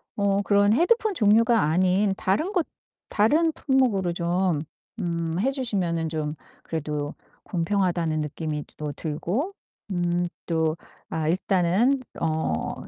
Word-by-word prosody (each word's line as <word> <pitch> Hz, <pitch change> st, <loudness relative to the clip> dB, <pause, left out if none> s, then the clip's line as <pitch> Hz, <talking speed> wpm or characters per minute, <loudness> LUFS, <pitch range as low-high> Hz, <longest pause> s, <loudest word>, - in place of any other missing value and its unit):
어 200 Hz, -1 st, +2 dB
그런 205 Hz, +1 st, +4 dB
헤드폰 425 Hz, -, +3 dB
종류가 230 Hz, -, +4 dB
아닌 185 Hz, +5 st, +2 dB
다른 310 Hz, -, 0 dB
것 360 Hz, -5 st, +1 dB, 0.4 s
다른 305 Hz, +11 st, +3 dB
품목으로 240 Hz, -, +1 dB
좀 175 Hz, -2 st, 0 dB, 0.4 s
음 170 Hz, -1 st, -2 dB
해 265 Hz, +6 st, +2 dB
주시면은 180 Hz, -, -1 dB
좀 155 Hz, -1 st, -2 dB, 0.3 s
그래도 150 Hz, -2 st, -3 dB, 0.3 s
공평하다는 170 Hz, -3 st, 0 dB
느낌이 150 Hz, 0 st, -3 dB
또 150 Hz, -1 st, -4 dB
들고 175 Hz, -, -2 dB, 0.4 s
음 175 Hz, 0 st, 0 dB, 0.2 s
또 160 Hz, -1 st, +1 dB, 0.3 s
아 160 Hz, -1 st, -2 dB
일단은 190 Hz, +9 st, +2 dB, 0.2 s
어 155 Hz, -, -1 dB
180 Hz, 230 characters per minute, -25 LUFS, 160-215 Hz, 0.4 s, 그런